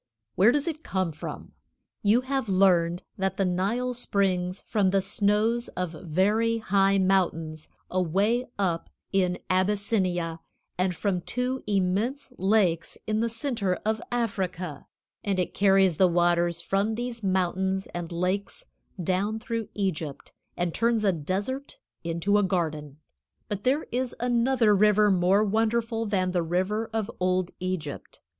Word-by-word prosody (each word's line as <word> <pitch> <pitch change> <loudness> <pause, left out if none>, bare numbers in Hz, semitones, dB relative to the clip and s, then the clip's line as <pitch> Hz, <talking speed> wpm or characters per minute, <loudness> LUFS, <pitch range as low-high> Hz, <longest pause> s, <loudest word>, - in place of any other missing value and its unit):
Where 205 +6 +5
does 290 +4 0
it 315 -2 -3
come 185 - -1
from? 155 - -8 0.5
You 215 +4 +4
have 265 -3 -2
learned 180 -3 +3 0.2
that 190 0 -1
the 195 - +2
Nile 205 +8 0
springs 190 -6 0
from 205 -4 +1
the 195 +1 +3
snows 210 +4 +1
of 180 -2 -1
very 195 +8 +1
high 195 -2 +2
mountains 165 -5 0 0.2
away 195 +8 +1
up 180 -4 -1 0.2
in 180 -2 +1
Abyssinia, 185 -3 0 0.4
and 180 0 0
from 185 -1 -1
two 250 +7 -2
immense 210 +8 0
lakes 190 -4 +2
in 215 0 0
the 230 +1 +1
center 225 -6 -1
of 220 0 0
Africa, 185 - -3 0.4
and 200 -2 0
it 180 - -1
carries 195 -4 +4
the 185 - +5
waters 175 0 +2
from 200 +3 0
these 240 0 -4
mountains 190 0 0
and 175 -1 -5
lakes 180 +4 -2 0.4
down 190 +5 0
through 225 -1 -4
Egypt, 165 -8 -3 0.3
and 175 -1 -1
turns 230 -1 +1
a 200 - +4
desert 200 - -3 0.3
into 170 +5 +1
a - - +2
garden. 155 -6 -2 0.5
But 205 -1 -5
there 275 +5 +2
is 250 0 -1
another 240 -2 +3
river 210 +1 +4
more 190 +3 +3
wonderful 225 +1 0
than 185 -3 0
the 180 -1 +1
river 185 +7 -1
of 220 -2 -2
old 185 0 +1
Egypt. 180 -6 -5
195 Hz, 140 wpm, -27 LUFS, 180-220 Hz, 0.5 s, Where